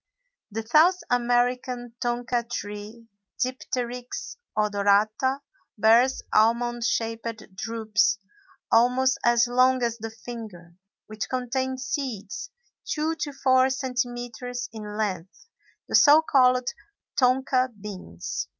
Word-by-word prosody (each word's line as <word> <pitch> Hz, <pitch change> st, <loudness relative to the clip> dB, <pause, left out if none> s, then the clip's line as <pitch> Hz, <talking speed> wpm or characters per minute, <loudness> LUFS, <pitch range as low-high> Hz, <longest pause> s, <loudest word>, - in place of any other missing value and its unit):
The 225 Hz, +1 st, -4 dB
South 320 Hz, +10 st, +5 dB
American 245 Hz, 0 st, 0 dB
tonka 240 Hz, 0 st, -1 dB
tree, 210 Hz, +1 st, -6 dB, 0.3 s
Dipteryx 250 Hz, -1 st, -4 dB, 0.2 s
odorata, 210 Hz, +5 st, +2 dB, 0.4 s
bears 230 Hz, +5 st, +4 dB
almond 235 Hz, +2 st, +2 dB
shaped 225 Hz, -2 st, -3 dB
drupes 215 Hz, -2 st, 0 dB, 0.5 s
almost 250 Hz, +3 st, +3 dB
as 235 Hz, 0 st, +4 dB
long 255 Hz, +1 st, +3 dB
as 235 Hz, -1 st, -1 dB
the 225 Hz, +1 st, -5 dB
finger, 220 Hz, -7 st, -10 dB, 0.3 s
which 215 Hz, -1 st, -6 dB
contain 260 Hz, +1 st, -2 dB
seeds 260 Hz, -, -4 dB, 0.3 s
two 310 Hz, +1 st, -1 dB
to 295 Hz, -, -3 dB
four 260 Hz, -1 st, +3 dB
centimetres 245 Hz, -2 st, -3 dB
in 210 Hz, -1 st, -7 dB
length, 190 Hz, -5 st, -4 dB, 0.4 s
the -, -, -9 dB
so 305 Hz, +2 st, +7 dB
called 255 Hz, -4 st, +3 dB, 0.5 s
tonka 255 Hz, 0 st, +2 dB
beans. 185 Hz, -, -6 dB
240 Hz, 100 wpm, -25 LUFS, 220-255 Hz, 0.5 s, so